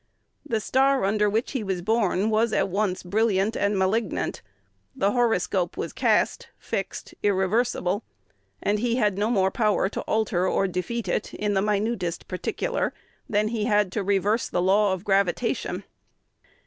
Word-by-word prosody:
The 235 -7 -1
star 265 +2 +2
under 210 +1 +2
which 220 +4 -1
he 260 -5 -2
was 190 -3 -3
born 215 -1 +1
was 220 +1 +2
at - - +1
once 190 -1 -1
brilliant 205 +2 +1
and 200 0 +1
malignant: 190 +2 0 0.5
the 200 +1 +1
horoscope 205 -6 +1
was - - -4
cast, - - +1
fixed, - - -5
irreversible; 205 0 +1 0.6
and 205 +1 +1
he 235 +1 +1
had 210 -5 +1
no 210 +2 +1
more 190 -5 +2
power 210 -3 +1
to - - -4
alter 205 -4 +1
or 195 - +1
defeat 190 +4 -3
it 195 - -2
in 210 -1 -1
the 190 - +2
minutest 205 -4 -1
particular - - -2 0.3
than 210 0 +1
he 220 -2 -1
had 205 -3 +2
to 210 - -1
reverse 200 +3 +1
the - - -1
law 195 +3 +3
of 190 -1 -3
gravitation. 200 +3 0
205 Hz, 155 wpm, -25 LUFS, 190-225 Hz, 0.6 s, law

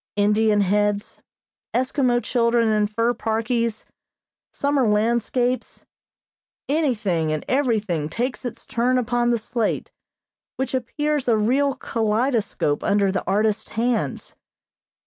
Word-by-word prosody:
Indian 210 +1 +3
heads, 205 +1 0 0.5
Eskimo 255 -1 +1
children 235 -1 +2
in 210 -1 +2
fur 230 +3 0
parkies, 230 0 -1 0.7
summer 280 -3 +1
landscapes, 235 +4 0 0.8
anything 215 - 0
and 155 -1 -3
everything 215 - 0
takes 245 +6 -3
its 240 -2 -6
turn 245 +2 +1
upon 240 0 +1
the 240 - +2
slate, 225 0 -2 0.6
which 265 0 -3
appears 295 +3 -1
a 230 -2 +4
real 265 +6 +2
kaleidoscope 220 - 0
under 200 -1 +2
the 190 - -2
artist's 210 +2 +1
hands. 235 +1 -2
230 Hz, 110 wpm, -23 LUFS, 210-250 Hz, 0.8 s, a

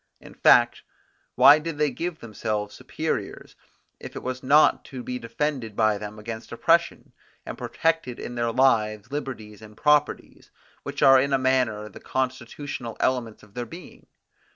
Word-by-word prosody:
In - - -14
fact, - - +4 0.5
why 145 +2 +8
did 160 -1 -5
they 150 -1 +1
give 165 +6 -4
themselves 105 -2 -4
superiors, - - -5 0.4
if - - -10
it - - -7
was 130 0 -4
not 145 +4 +4
to 130 -3 -8
be 125 0 -4
defended 115 -1 -3
by 110 -2 +2
them 105 +1 -8
against 110 +1 -8
oppression, 170 +8 +1 0.3
and - - -6
protected 160 -7 -1
in 120 - -6
their 120 -1 -1
lives, 110 -3 +1
liberties, 115 -7 -6
and 105 -1 -14
properties, 150 0 0 0.3
which - - -4
are 135 -1 +7
in 140 +1 -1
a - - +5
manner 130 -5 0
the 100 - -12
constitutional 130 -1 -4
elements 120 -4 -1
of 105 -2 -19
their 120 0 -5
being? 170 +9 -13
125 Hz, 155 wpm, -25 LUFS, 110-140 Hz, 0.5 s, why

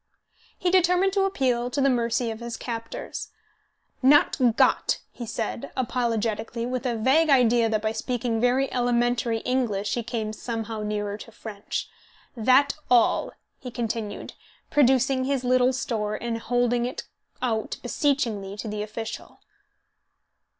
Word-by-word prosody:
He 355 - 0
determined 365 +1 +3
to 395 -1 +2
appeal 250 -9 0
to 280 - -2
the 275 - +4
mercy 235 -2 +1
of 220 - -7
his 235 -1 -5
captors. 230 -1 -6 0.7
"Not 260 -3 +4
got," - - +3
he 235 - -8
said, 225 +1 -4
apologetically, 230 -2 -1
with 255 +1 -2
a 240 - 0
vague 270 +8 +3
idea 240 -4 +4
that 215 -1 0
by 220 - +1
speaking 230 0 -2
very 255 +2 +2
elementary 240 -1 +1
English 230 -6 -1
he 240 - 0
came 220 -2 -3
somehow 225 -1 -4
nearer 210 -1 -3
to 230 - -11
French, 215 -2 -5 0.5
"That 255 +5 +4 0.2
all," 240 -2 +3 0.3
he 255 - -7
continued, 230 -3 -4 0.4
producing 265 -1 +3
his 270 -1 0
little 250 0 +3
store 220 -5 -2
and 230 0 -3
holding 245 0 +1
it 255 - -5 0.4
out 225 -3 -2
beseechingly 230 - -1
to 220 - -5
the 210 0 -3
official. 220 +1 -6
240 Hz, 135 wpm, -25 LUFS, 225-255 Hz, 0.7 s, the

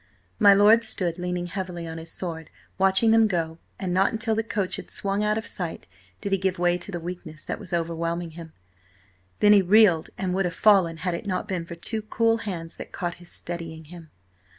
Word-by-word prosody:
My 205 -3 +8
lord 215 +3 +6
stood 180 -6 0
leaning 180 0 -2
heavily 175 -1 -5
on 165 0 -6
his 165 0 -5
sword, 160 -3 -5 0.3
watching 195 +4 +4
them 225 -1 +5
go, 165 -4 -2 0.2
and 185 -3 -3
not 190 +2 +3
until 225 0 -1
the 220 - +1
coach 205 -4 -2
had - - -9
swung 200 +1 -1
out 210 0 +1
of 220 - -4
sight 175 -5 -5 0.4
did 200 - -3
he 195 - +2
give 190 0 0
way 175 0 +2
to 200 - -6
the 175 - -3
weakness 165 -3 -7
that - - -4
was 180 - -9
overwhelming 170 0 -2
him. 165 0 -10 0.9
Then 210 0 +7
he 205 - +7
reeled 190 -4 +5
and 185 -1 -2
would 195 0 +1
have 175 - -3
fallen, 190 -6 +4
had 180 +1 -2
it 170 - -5
not 185 -2 -2
been 180 -3 -3
for 170 - -8
two 220 +6 -2
cool 225 +1 +1
hands 175 -7 -6
that - - -9
caught 175 -1 -3
his, 175 - -12
steadying 165 -2 -5
him. 165 -3 -11
180 Hz, 215 wpm, -25 LUFS, 170-205 Hz, 0.9 s, My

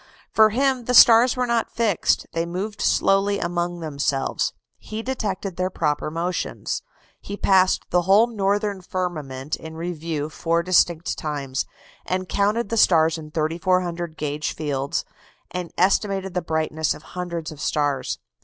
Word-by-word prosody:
For 220 0 +6
him 260 +1 +1
the 250 - +1
stars 235 +1 +8
were 250 - +1
not 235 -1 0
fixed: 225 -6 +1
they 165 - 0
moved 195 +5 -4
slowly 195 +1 +2
among 175 -1 -2
themselves. 140 -3 -1 0.3
He 215 +1 -6
detected 200 -7 -3
their 185 0 0
proper 150 -5 -1
motions. 170 +3 -3 0.4
He 200 - -7
passed 190 -2 +3
the 180 - +4
whole 195 +5 +5
northern 205 -3 -1
firmament 155 -8 -4
in 160 0 -9
review 165 -3 -3
four 165 +1 0
distinct 175 -2 +2
times; 140 -3 -3 0.6
counted 205 +4 +1
the 230 - -1
stars 165 -5 +4
in 155 -1 -9
3,400 170 +1 -1
gauge 150 0 -3
fields, 140 -2 -2 0.5
and 180 -1 -4
estimated 195 0 +1
the 180 - 0
brightness 160 -1 -1
of - - -13
hundreds 170 -3 -5
of 150 -1 -10
stars. 145 -4 0
175 Hz, 140 wpm, -23 LUFS, 155-200 Hz, 0.6 s, stars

